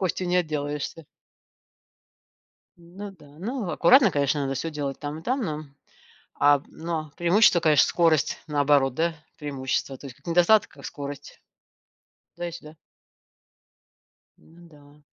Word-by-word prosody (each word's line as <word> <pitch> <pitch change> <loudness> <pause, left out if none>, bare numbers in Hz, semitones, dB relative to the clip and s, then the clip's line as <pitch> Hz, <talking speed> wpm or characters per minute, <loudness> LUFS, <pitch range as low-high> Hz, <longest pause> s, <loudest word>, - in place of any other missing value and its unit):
костью 185 -1 -1
не 180 - +2
отделаешься. 150 -1 -3 1.7
Ну 185 +4 -10
да. 150 -5 -18
Ну, 225 0 -4
аккуратно, 195 - +5
конечно, 145 0 +1
надо 135 -1 -2
всё 165 - -3
делать 145 -3 -4
там 150 +1 -5
и 160 - -15
там, 260 +2 -1
но, 155 -7 -4 0.7
а, 145 -1 +4
но 160 -2 -5
преимущество, 175 +1 +4
конечно, 150 -3 +5
скорость, 160 -6 +1
наоборот, 145 -3 +2
да, 165 +3 0 0.2
преимущество. 135 -2 -3
То 140 - -11
есть 125 -3 -11
как - - -25
недостаток, 175 +5 +4
как 140 -2 -15
скорость. 145 -1 -8 1.0
То 175 - -5
есть. 170 -1 -6
Да. 150 +1 -13 1.6
Ну 170 +1 -19
да. 145 -1 -20
155 Hz, 135 wpm, -25 LUFS, 145-175 Hz, 1.7 s, аккуратно